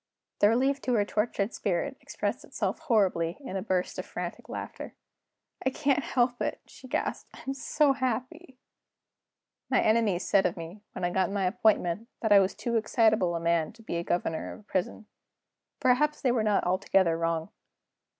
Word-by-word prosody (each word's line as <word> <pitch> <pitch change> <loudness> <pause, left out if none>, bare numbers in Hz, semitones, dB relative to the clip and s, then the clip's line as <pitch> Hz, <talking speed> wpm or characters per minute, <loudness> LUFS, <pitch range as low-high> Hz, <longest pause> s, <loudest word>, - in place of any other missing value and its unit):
The 205 - +6
relief 270 +4 +2
to 250 - 0
her 205 -2 +3
tortured 210 0 -1
spirit 205 +8 -1
expressed - - -3
itself - - -3
horribly 195 - +1
in 260 -9 -7
a 190 - -1
burst 185 -3 -1
of - - -4
frantic - - -6
laughter. - - -7 0.7
"I 265 - +3
can't 280 +1 +1
help 245 -1 0
it," - - -1
she 260 - -14
gasped; - - -2
"I'm 270 - -5
so 280 +1 +2
happy." 260 +3 -3 1.1
My - - +3
enemies 215 -5 +2
said 195 -2 +4
of 180 - -5
me, 170 +5 -8
when - - -6
I 175 - +1
got 185 -1 +1
my 200 -1 -1
appointment, 210 0 +1 0.2
that 220 - +1
I 200 - +9
was 190 0 +1
too 235 -1 -1
excitable 220 -5 +2
a - - -1
man 165 -1 +1
to 225 0 -17
be 170 -6 -2
governor 170 -2 -2
of - - -12
a - - -23
prison. 190 +1 -3 0.7
Perhaps 300 +4 +2
they 255 - +4
were 240 -2 +1
not 210 -2 +2
altogether 185 -1 +2
wrong. 165 +1 -1
215 Hz, 175 wpm, -28 LUFS, 180-250 Hz, 1.1 s, I